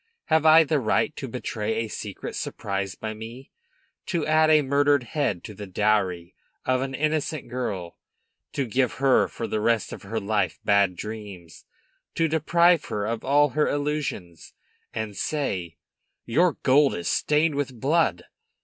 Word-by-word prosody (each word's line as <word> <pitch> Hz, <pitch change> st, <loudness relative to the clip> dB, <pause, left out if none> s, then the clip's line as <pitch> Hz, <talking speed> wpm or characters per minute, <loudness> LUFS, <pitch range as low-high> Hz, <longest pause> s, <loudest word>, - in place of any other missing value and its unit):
Have 160 Hz, 0 st, +4 dB
I 160 Hz, +1 st, +8 dB
the 155 Hz, -1 st, +1 dB
right 110 Hz, -5 st, +1 dB
to -, -, -5 dB
betray 110 Hz, 0 st, -3 dB
a 115 Hz, 0 st, -1 dB
secret 105 Hz, -2 st, -6 dB
surprised 100 Hz, -1 st, -4 dB
by 110 Hz, 0 st, -4 dB
me, 115 Hz, +5 st, -10 dB, 0.6 s
to 170 Hz, -6 st, -1 dB
add 155 Hz, 0 st, +4 dB
a 155 Hz, -1 st, +5 dB
murdered 145 Hz, 0 st, +3 dB
head 120 Hz, -, -2 dB
to 105 Hz, -, -8 dB
the 105 Hz, 0 st, -8 dB
dowry 95 Hz, -3 st, 0 dB, 0.3 s
of 130 Hz, 0 st, +1 dB
an 135 Hz, 0 st, -3 dB
innocent 155 Hz, 0 st, -1 dB
girl, 100 Hz, -9 st, -4 dB, 0.5 s
to 140 Hz, -, -1 dB
give 125 Hz, +2 st, 0 dB
her 135 Hz, -1 st, +3 dB
for 115 Hz, -, -6 dB
the 110 Hz, -1 st, -2 dB
rest 115 Hz, -1 st, +1 dB
of -, -, -8 dB
her 110 Hz, +3 st, -3 dB
life 100 Hz, -7 st, -1 dB
bad 100 Hz, -3 st, +3 dB
dreams, 100 Hz, -4 st, -8 dB, 0.5 s
to 165 Hz, -, +2 dB
deprive 170 Hz, +2 st, +3 dB
her 105 Hz, -1 st, -3 dB
of 115 Hz, +1 st, -3 dB
all 145 Hz, +2 st, +4 dB
her 150 Hz, +4 st, +1 dB
illusions, 145 Hz, -, -3 dB, 0.4 s
and 110 Hz, -2 st, -4 dB
say, 95 Hz, -, -3 dB, 0.5 s
'Your 165 Hz, +8 st, +3 dB
gold 140 Hz, +1 st, +4 dB
is 85 Hz, -, -4 dB
stained 150 Hz, +1 st, +2 dB
with 135 Hz, -4 st, -3 dB
blood'? 135 Hz, -, +1 dB
120 Hz, 160 wpm, -25 LUFS, 105-150 Hz, 0.6 s, I